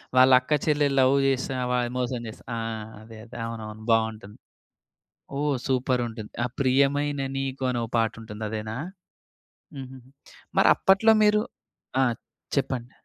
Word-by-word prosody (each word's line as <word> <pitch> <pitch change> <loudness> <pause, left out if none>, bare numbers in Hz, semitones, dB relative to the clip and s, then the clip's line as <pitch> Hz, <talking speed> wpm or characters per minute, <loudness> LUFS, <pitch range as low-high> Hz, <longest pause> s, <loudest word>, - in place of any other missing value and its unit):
వాళ్ళక్కా 130 +3 +6
చెల్లెలు 145 -2 +2
లవ్ 130 +1 +5
జేస్తున్న 130 -1 0
వాళ్ 125 -1 +1
మోసం 125 0 -1
చేశా 110 - -10
ఆ! - - -2 0.4
అదే. 110 0 -12
అదే. 120 - -11
అవునవును. 110 -1 -7
బావుంటుంది. 110 -2 0 1.0
ఓహ్! 145 -1 +1
సూపరుంటుంది. 125 -4 -1
ఆ! - - +1
'ప్రియమైన 140 +2 +2 0.2
నీకు' 135 -1 -2
అనో 120 -1 -1 0.2
పాటుంటుంది 110 -1 -3
అదేనా? 110 +1 -4 1.0
హుహుహు. 130 -1 -8 0.6
మరప్పట్లో 200 +4 +5
మీరు 210 0 +4 0.6
ఆ! - - +5 0.5
చెప్పండి. 130 -3 -2
130 Hz, 115 wpm, -26 LUFS, 115-135 Hz, 1.0 s, వాళ్ళక్కా